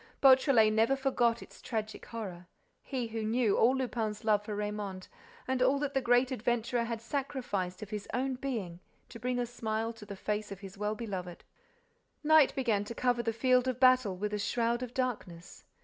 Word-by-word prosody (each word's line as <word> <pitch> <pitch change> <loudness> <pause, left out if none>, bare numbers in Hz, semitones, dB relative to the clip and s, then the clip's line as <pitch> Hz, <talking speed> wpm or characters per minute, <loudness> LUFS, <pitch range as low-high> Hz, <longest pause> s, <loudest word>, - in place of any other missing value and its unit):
Beautrelet 260 -5 +6
never 225 +5 +3
forgot 250 -4 +1
its - - -16
tragic 220 -2 -4
horror, 185 -6 -7 0.3
he 255 -4 -3
who 225 0 -3
knew 225 -1 +2
all 250 +4 +4
Lupin's 225 -4 -2
love 210 -2 +3
for 210 0 -5
Raymonde 205 -2 -4 0.4
and 260 -1 0
all 265 +2 +4
that 280 0 -2
the 270 - +1
great 245 +1 +3
adventurer 240 0 0
had 230 -1 -3
sacrificed 230 -8 -3
of 210 - -10
his 210 -1 -5
own 265 +1 0
being 225 -10 -4 0.3
to 230 - -10
bring 250 +2 -1
a 245 - 0
smile 225 -1 -3
to 225 -2 -12
the 200 - -6
face 210 +1 -3
of 195 -1 -8
his 195 -1 -9
well 210 +1 -2
beloved. 190 -6 -6 0.8
Night 310 -2 +5
began 230 -7 +1
to 235 - -7
cover 245 0 +1
the 230 -1 -1
field 250 +2 +3
of 255 -1 -1
battle 255 -7 +4
with 210 +2 -3
a 210 - -1
shroud 235 +3 0
of 250 -1 -6
darkness. 200 -9 -4
230 Hz, 190 wpm, -31 LUFS, 210-255 Hz, 0.8 s, Beautrelet